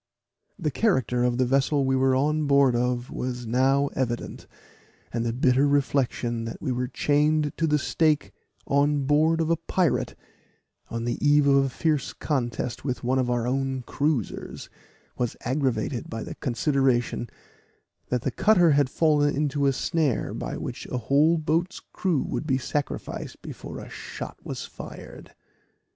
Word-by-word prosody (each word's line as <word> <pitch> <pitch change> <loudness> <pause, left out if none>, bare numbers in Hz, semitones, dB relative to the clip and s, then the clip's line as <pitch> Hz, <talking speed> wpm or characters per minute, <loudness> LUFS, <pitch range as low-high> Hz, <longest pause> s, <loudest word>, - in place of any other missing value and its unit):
The 160 -6 -1
character 130 - +1
of 120 -1 +1
the 130 - +3
vessel 135 +2 +2
we 135 0 +2
were 130 0 +3
on 150 +3 +1
board 140 -3 +4
of 125 0 -1
was 125 -1 -4
now 135 +4 +3
evident; 120 -2 -3 0.7
and 115 -1 -1
the 115 - 0
bitter 130 +3 +3
reflection 130 -4 0
that 115 - -6
we 135 - -2
were 125 0 -1
chained 150 +2 +1
to 165 - +1
the 150 -1 +3
stake 155 0 +1 0.3
on 145 0 +2
board 155 +4 +3
of 165 0 +1
a 165 - +3
pirate, 170 +1 0 0.7
on 115 0 -3
the 120 - -2
eve 145 0 +5
of 140 -1 +4
a - - -1
fierce 150 +1 -1
contest 120 -4 -2
with 130 -2 -3
one 130 +2 +1
of 125 -1 0
our 120 -1 0
own 135 0 -1
cruisers, 140 -4 -2 0.5
was 120 -2 -1
aggravated 130 -2 -1
by 115 -1 -4
the - - -6
consideration, 130 -3 0 0.8
that 125 -1 -1
the - - 0
cutter 180 -6 +4
had 145 -2 +3
fallen 145 -1 +2
into 145 -1 +1
a - - +4
snare 155 -1 0
by - - -4
which - - -6
a - - -3
whole 145 +7 +3
boat's 165 +4 -1
crew 175 -7 -1
would 155 - -4
be 130 -3 +2
sacrificed 140 +2 -4
before - - -8
a - - -8
shot - - -8
was - - -5
fired. - - -11
135 Hz, 160 wpm, -26 LUFS, 125-150 Hz, 0.8 s, eve